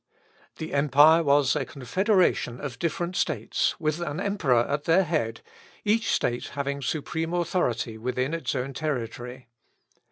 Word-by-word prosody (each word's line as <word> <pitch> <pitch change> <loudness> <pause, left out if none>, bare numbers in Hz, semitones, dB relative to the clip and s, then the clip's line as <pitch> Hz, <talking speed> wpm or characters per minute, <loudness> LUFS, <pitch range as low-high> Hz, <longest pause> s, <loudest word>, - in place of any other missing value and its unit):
The 160 - -6
empire 150 +3 +6
was 145 -3 +3
a 145 - 0
confederation 145 - +1
of 135 -4 -6
different 175 +2 -2
states, 130 -12 0
with 155 0 -1
an 170 -1 -3
emperor 175 - +2
at 145 +1 -2
their 175 +4 +4
head, 150 -10 -2 0.4
each 220 +2 +2
state 120 0 0
having 140 0 -2
supreme 160 +5 -2
authority 125 -10 -1
within 125 +5 -2
its 165 -2 -2
own 135 +1 -3
territory. 125 -3 -4
145 Hz, 135 wpm, -26 LUFS, 125-165 Hz, 0.4 s, empire